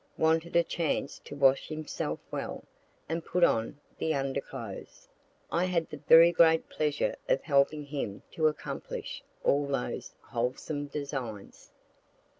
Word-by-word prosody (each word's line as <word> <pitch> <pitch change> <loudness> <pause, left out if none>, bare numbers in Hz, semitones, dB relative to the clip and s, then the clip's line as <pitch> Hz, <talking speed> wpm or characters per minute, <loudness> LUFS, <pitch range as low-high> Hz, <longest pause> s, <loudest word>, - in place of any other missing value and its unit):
Wanted 160 +1 +2
a 170 - +6
chance 160 -4 -2
to 145 - -8
wash 135 -1 +4
himself 155 -1 -3
well, - - -4 0.4
and 165 +1 -2
put 180 - 0
on 115 +1 +2 0.2
the 160 -1 +1
underclothes. 135 -1 -5 0.4
I 175 +2 +2
had 170 -3 0
the 150 - -5
very 165 +4 +7
great 165 -1 +5
pleasure 150 -1 0
of - - +2
helping 145 +1 +2
him 135 -9 -4
to 155 -1 +2
accomplish 150 - -4 0.2
all 140 0 +3
those 135 -3 -3
wholesome 130 +5 -3
designs. 135 -8 -6
150 Hz, 130 wpm, -30 LUFS, 140-160 Hz, 0.4 s, very